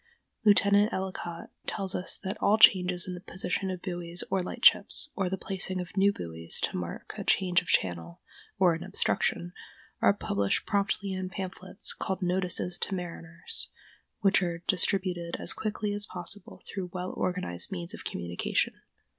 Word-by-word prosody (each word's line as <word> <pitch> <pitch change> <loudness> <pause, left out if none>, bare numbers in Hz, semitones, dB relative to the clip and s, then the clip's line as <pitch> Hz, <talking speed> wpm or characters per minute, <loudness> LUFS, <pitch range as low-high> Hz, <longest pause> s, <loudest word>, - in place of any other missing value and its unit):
Lieutenant 205 0 +5
Ellicott 185 -3 -5 0.2
tells 195 -3 -1
us 180 - -2
that 190 +2 -2
all 210 - +4
changes 180 -5 +6
in 185 - -4
the 180 - -6
position 190 0 -2
of 185 -1 -5
buoys 175 -1 -2
or 190 -1 +2
lightships, 240 +9 +3
or 190 -3 0
the 190 - -2
placing 190 -1 -3
of 180 +2 -7
new 200 +1 +4
buoys 85 - 0
to - - -1
mark 90 -1 -5
a - - -3
change 180 -2 +3
of - - -16
channel, 85 -2 0 0.4
or 185 -3 +5
an 165 - -5
obstruction, 85 +1 0 0.5
are - - +6
published 100 -1 0
promptly 200 -1 0
in 185 0 -3
pamphlets 190 +2 0
called 190 0 -3
"Notices 180 -1 0
to 195 - -1
Mariners," 170 - 0 0.5
which 195 0 +4
are 170 -1 -3
distributed 180 -2 0
as - - +1
quickly 210 -1 -2
as 205 0 +4
possible 180 +3 -7
through 190 -2 -5
well 180 0 -4
organized 180 - -2
means 175 +1 -4
of - - -8
communication. 85 0 -1
185 Hz, 160 wpm, -29 LUFS, 170-195 Hz, 0.5 s, changes